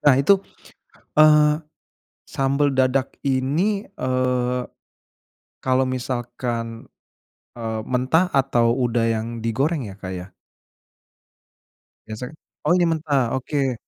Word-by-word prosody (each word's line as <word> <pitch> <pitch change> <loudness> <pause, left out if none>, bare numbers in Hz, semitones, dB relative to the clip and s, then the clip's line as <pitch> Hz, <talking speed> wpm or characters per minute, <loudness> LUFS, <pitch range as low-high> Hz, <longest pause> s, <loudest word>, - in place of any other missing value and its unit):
nah 140 -3 +6
itu, 190 +8 +4 0.8
eee, 150 0 +5 0.6
sambal 140 +1 +1
dadak 130 0 +1
ini, 150 +11 0
eee, 125 -2 0 1.0
kalo 130 0 +1
misalkan, 120 -2 -3 0.7
eee, 110 -2 -3
mentah 130 +8 +2
atau 120 -3 +3
udah 120 -2 +1
yang 110 +1 -3
digoreng 130 +5 -1
ya, 95 - -9
Kak, 95 -2 -7
ya? 90 0 -6 1.8
Biasa 110 +3 -6 0.4
oh - - +4
ini 175 - +3
mentah, 145 -6 0
oke. 135 0 -1
130 Hz, 100 wpm, -22 LUFS, 120-145 Hz, 1.8 s, nah